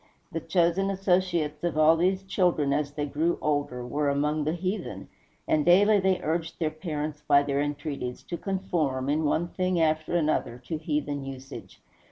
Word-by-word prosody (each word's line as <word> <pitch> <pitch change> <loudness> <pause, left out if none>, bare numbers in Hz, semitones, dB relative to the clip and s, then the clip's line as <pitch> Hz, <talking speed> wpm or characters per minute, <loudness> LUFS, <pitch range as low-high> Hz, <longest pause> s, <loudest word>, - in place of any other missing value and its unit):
The 165 - -2
chosen 170 +3 +1
associates 180 -5 0
of 170 -3 -1
all 155 +1 +6
these 185 +3 +1
children, 175 -7 +1
as 145 0 -1
they 145 0 -2
grew 155 +4 0
older, 145 -4 -1
were 145 +3 0
among 150 +2 0
the 155 - 0
heathen; 175 - -4 0.4
and 150 - +2
daily 205 +5 +5
they 190 -1 +2
urged 160 +1 -2
their 160 -2 -1
parents, 155 -2 -4
by 140 -1 +5
their 140 0 0
entreaties, 145 -3 -4
to 175 - -5
conform, 165 -9 -1
in 155 +2 +1
one 170 +3 +1
thing 185 -1 0
after 155 +1 +1
another, 155 -7 0
to 160 +2 -3
heathen 145 -2 -2
usage. 135 0 -9
155 Hz, 170 wpm, -27 LUFS, 145-175 Hz, 0.4 s, all